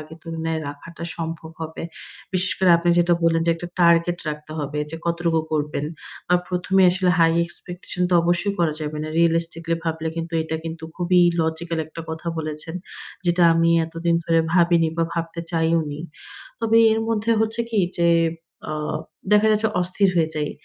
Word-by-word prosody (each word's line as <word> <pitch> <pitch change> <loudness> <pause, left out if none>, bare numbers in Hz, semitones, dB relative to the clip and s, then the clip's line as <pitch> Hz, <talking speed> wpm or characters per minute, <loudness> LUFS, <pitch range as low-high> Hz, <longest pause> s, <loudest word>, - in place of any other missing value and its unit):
আগের 155 +2 -11
তুলনায় 165 -1 -3
রাখাটা 165 +4 -10
সম্ভব 165 -1 -5
হবে। 160 0 -6 0.5
বিশেষ 185 +1 +1
করে 185 -1 +4
আপনি 170 +1 -1
যেটা 175 0 +4
বললেন 165 0 +3
যে - - +4
একটা 175 +1 -7
target 170 0 +4
রাখতে 150 0 -6
হবে 150 0 -3
যে 165 - -5
কতটুকু 170 -1 +1
করবেন 150 -1 -1 0.4
বা 180 - +4
প্রথমেই 185 +1 +3
আসলে 180 0 +1
high 165 0 +4
expectation 180 +1 -6
তো - - +3
অবশ্যই 175 +4 +1
করা 170 -3 +2
যাবে 150 0 -4
না, 155 - -4
realistically 165 0 +1
ভাবলে 160 -1 -2
কিন্তু 165 0 -4
এটা 160 0 -3
কিন্তু 160 0 -6
খুবই 180 0 +3 0.2
logical 160 +1 -2
একটা 160 - -9
কথা 160 +1 -5
বলেছেন, 155 +1 -5 0.5
যেটা 175 0 +3
আমি 165 0 +3
এতদিন 165 +1 -1
ধরে 165 -1 +3
ভাবিনি 170 -2 +4
বা 165 - +2
ভাবতে 170 0 -3
চাইওনি। 160 -3 0 0.6
তবে 225 0 +2 0.2
এর 220 - 0
মধ্যে 225 0 0
হচ্ছে 220 +1 0
কি 220 - 0 0.2
যে, 170 0 +4 0.6
আ - - -2 0.6
দেখা 210 +1 +5
যাচ্ছে 215 +1 +2
অস্থির 185 +2 +2
হয়ে 160 -2 +3
যাই। 150 -1 -1
165 Hz, 170 wpm, -22 LUFS, 160-175 Hz, 0.6 s, দেখা